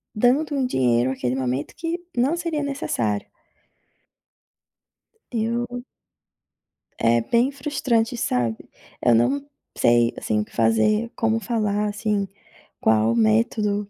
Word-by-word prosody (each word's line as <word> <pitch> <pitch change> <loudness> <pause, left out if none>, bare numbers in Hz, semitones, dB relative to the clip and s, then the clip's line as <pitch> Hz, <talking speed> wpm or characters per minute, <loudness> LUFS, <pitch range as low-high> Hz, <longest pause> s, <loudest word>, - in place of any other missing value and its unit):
dando 260 +8 +2
um 270 -2 +1
dinheiro 125 - +2
aquele 125 -1 -2
momento 130 +2 -2
que 335 +1 -3 0.2
não 270 +8 +2
seria 335 -4 -2
necessário. 115 - -2 2.0
Eu 235 +1 -1 1.3
É 115 +1 +3
bem 235 - +2
frustrante, 260 -4 -1
sabe? 120 - -1 0.3
Eu 120 - +5
não 275 - +2 0.3
sei, 120 0 +3
assim, 105 -1 -1
o - - -1
que - - -22
fazer, 115 - +2
como 225 0 +1
falar 210 -2 0
assim, 205 -1 -1 0.5
qual 110 +1 +3
método, 200 - +1
210 Hz, 110 wpm, -23 LUFS, -, 2.0 s, Eu